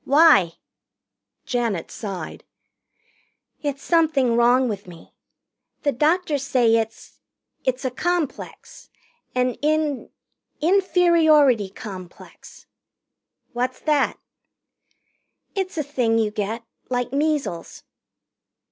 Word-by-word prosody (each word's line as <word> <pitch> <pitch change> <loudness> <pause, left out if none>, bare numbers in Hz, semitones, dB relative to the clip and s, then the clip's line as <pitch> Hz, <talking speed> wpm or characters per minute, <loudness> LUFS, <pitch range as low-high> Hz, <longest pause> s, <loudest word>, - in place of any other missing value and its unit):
"Why?" 280 - +5 0.9
Janet 230 -9 -2
sighed. 195 -5 -6 1.2
"It's 280 -2 -3
something 310 -8 +2
wrong 245 +2 +4
with 205 -4 -5
me. 170 -2 -14 0.7
The 285 - +2
doctors 305 +2 +1
say 245 -5 +3
it's 225 0 -5 0.5
it's 260 0 -1
a 260 - 0
complex. 340 +2 -4 0.5
An 250 0 +1
in 300 -2 0 0.5
inferiority 320 - +4
complex." 185 -3 -11 0.9
"What's 250 +1 -2
that?" 295 -3 +1 1.4
"It's 380 -3 -3
a 305 - 0
thing 250 -5 0
you 220 -2 +1
get, 215 +2 -3 0.3
like 245 0 -2
measles." 285 - -2
260 Hz, 90 wpm, -23 LUFS, 225-305 Hz, 1.4 s, Why